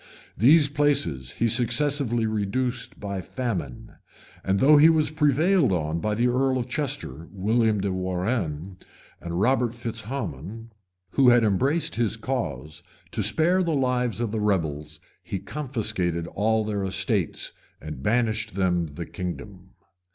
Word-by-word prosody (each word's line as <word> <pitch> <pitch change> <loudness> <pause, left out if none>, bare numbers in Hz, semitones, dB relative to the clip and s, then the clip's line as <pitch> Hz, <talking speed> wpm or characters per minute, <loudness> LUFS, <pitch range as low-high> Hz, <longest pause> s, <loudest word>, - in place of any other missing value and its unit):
These 145 - +6
places 135 - 0
he 115 - 0
successively 120 0 +1
reduced 110 +4 -2
by 100 -2 -4
famine; 90 - -5 0.5
and 95 +1 +1
though 145 +7 +6
he 155 +3 +7
was 155 -2 +2
prevailed 155 - +3
on 80 -2 -1
by 105 +4 -1
the 120 +3 +1
earl 130 +1 +1
of 120 - -3
Chester, 130 - -4
William 110 +2 +1
de 100 -1 -1
Warrenne, 90 - -2 0.4
and 85 0 -4
Robert 120 +1 +2
Fitz 115 -1 -5
Hammon, 115 - -6 0.4
who 135 -3 +5
had 120 -1 +5
embraced 130 - +1
his 115 -1 +1
cause, 80 - -4 0.3
to - - -2
spare 160 - +2
the 170 -4 0
lives 125 -3 0
of 115 -3 -1
the 110 -1 -2
rebels, 75 -7 -1 0.2
he 100 - -4
confiscated 110 - -2
all 110 +4 0
their 105 -2 -2
estates, 95 -1 -1 0.3
and 75 -3 -8
banished 110 - 0
them 90 -3 +1
the 80 +3 -7
kingdom. 95 +1 -7
110 Hz, 140 wpm, -25 LUFS, 90-130 Hz, 0.5 s, he